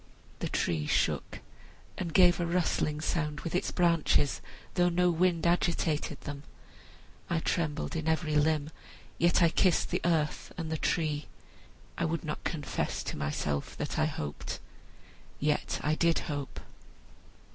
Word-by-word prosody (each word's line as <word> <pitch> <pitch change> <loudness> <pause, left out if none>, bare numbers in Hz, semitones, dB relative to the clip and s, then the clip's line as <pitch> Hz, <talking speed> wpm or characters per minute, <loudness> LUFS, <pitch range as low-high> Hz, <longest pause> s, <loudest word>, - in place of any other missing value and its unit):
The - - -2
tree 80 -3 0
shook - - 0 0.5
and 175 -3 -3
gave 175 +1 +6
a 175 - +1
rustling 165 -3 0
sound 150 -2 -1
with 165 - -4
its 180 - +1
branches, 170 -5 +2 0.3
though 175 -1 +3
no 180 +1 +3
wind 170 0 +2
agitated 170 -4 +1
them. 140 -1 -6 0.9
I 170 - +1
trembled 160 0 -1
in 160 -1 -2
every 160 -1 +1
limb, 150 0 +2 0.5
yet 175 +1 +4
I 170 - +6
kissed 180 +1 +2
the - - 0
earth 160 -3 0
and 165 -2 -4
the 160 - 0
tree. 155 -3 0 0.7
I 170 - +2
would 165 0 -1
not 150 -2 -4
confess 150 -4 -2
to - - -4
myself 75 0 -2
that - - -2
I - - +4
hoped, 75 0 -4 0.8
yet 150 +1 0
I 150 - +2
did 165 +1 +3
hope. 145 -3 -4
160 Hz, 145 wpm, -30 LUFS, 150-170 Hz, 0.9 s, gave